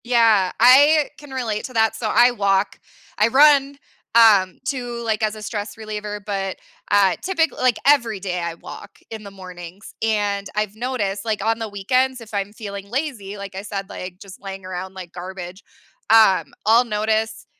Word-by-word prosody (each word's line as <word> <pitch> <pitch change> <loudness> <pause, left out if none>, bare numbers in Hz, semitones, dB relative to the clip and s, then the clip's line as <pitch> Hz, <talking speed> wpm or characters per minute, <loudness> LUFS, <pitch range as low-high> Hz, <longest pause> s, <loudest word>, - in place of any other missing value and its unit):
Yeah, 225 -6 +3
I 285 +5 +6
can 290 - -13
relate 230 -5 -3
to 255 - -9
that. 220 -1 +2
So 225 -1 -3
I 240 +3 +5
walk, 200 -3 0 0.4
I 210 - +5
run, 280 +2 +5 0.4
um, 205 -5 +5
too, 245 -3 -4
like, 220 -1 -1
as 215 0 0
a 215 - -10
stress 205 -1 -5
reliever, 210 -1 -6
but, 195 -2 -3 0.3
uh, 195 -3 +4
typically, 335 -3 -1
like, 255 -3 +3
every 235 -8 +3
day 180 -2 -3
I 170 -1 -4
walk 195 - -12
in 220 -1 -7
the 200 - -10
mornings 185 0 -11
and 205 -2 -1
I've 210 -1 -2
noticed, 215 -5 -3
like, 215 -2 -2
on 225 0 +1
the 225 -1 -4
weekends, 255 +6 0
if 225 -2 -13
I'm 200 0 -2
feeling 200 -2 -8
lazy, 235 -7 -4
like, 200 -1 -8
I 190 - -4
said, 195 -1 -6
like, 185 -2 -8
just 195 -2 -13
laying 195 -1 -8
around 185 +1 -6
like 180 -2 -9
garbage. 180 +1 -8 0.5
Um, 215 -4 +5
I'll 225 +3 +5
notice, 220 0 -1
210 Hz, 175 wpm, -21 LUFS, 195-235 Hz, 0.5 s, I